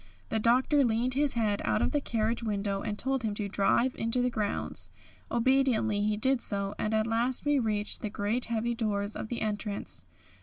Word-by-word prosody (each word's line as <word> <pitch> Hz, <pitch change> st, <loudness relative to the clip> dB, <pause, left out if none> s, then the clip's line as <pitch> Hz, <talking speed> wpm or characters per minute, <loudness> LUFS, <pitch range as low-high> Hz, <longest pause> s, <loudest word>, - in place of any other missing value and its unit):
The 220 Hz, -, 0 dB
Doctor 255 Hz, +6 st, +3 dB
leaned 240 Hz, +1 st, +1 dB
his 285 Hz, +1 st, +2 dB
head 215 Hz, -3 st, 0 dB
out 105 Hz, -1 st, +1 dB
of -, -, +1 dB
the 290 Hz, -, +1 dB
carriage 230 Hz, -2 st, -1 dB
window 200 Hz, -3 st, -2 dB
and 210 Hz, -1 st, -3 dB
told 265 Hz, +2 st, 0 dB
him 215 Hz, -3 st, -2 dB
to 205 Hz, -1 st, -2 dB
drive 210 Hz, +6 st, +2 dB
into 230 Hz, +2 st, 0 dB
the 250 Hz, -, +1 dB
grounds. 210 Hz, -3 st, -3 dB, 0.4 s
Obediently 235 Hz, -4 st, +2 dB
he 210 Hz, 0 st, +1 dB
did 260 Hz, +3 st, +2 dB
so, 200 Hz, -1 st, -1 dB
and 215 Hz, -, -1 dB
at 215 Hz, 0 st, +2 dB
last 235 Hz, +4 st, +1 dB
we 290 Hz, -1 st, +3 dB
reached 210 Hz, -3 st, 0 dB
the 215 Hz, -, -2 dB
great 210 Hz, +4 st, -1 dB
heavy 235 Hz, +1 st, -1 dB
doors 210 Hz, -3 st, -2 dB
of -, -, -4 dB
the 235 Hz, +1 st, -4 dB
entrance. 205 Hz, -, -3 dB
225 Hz, 195 wpm, -29 LUFS, 205-245 Hz, 0.4 s, Doctor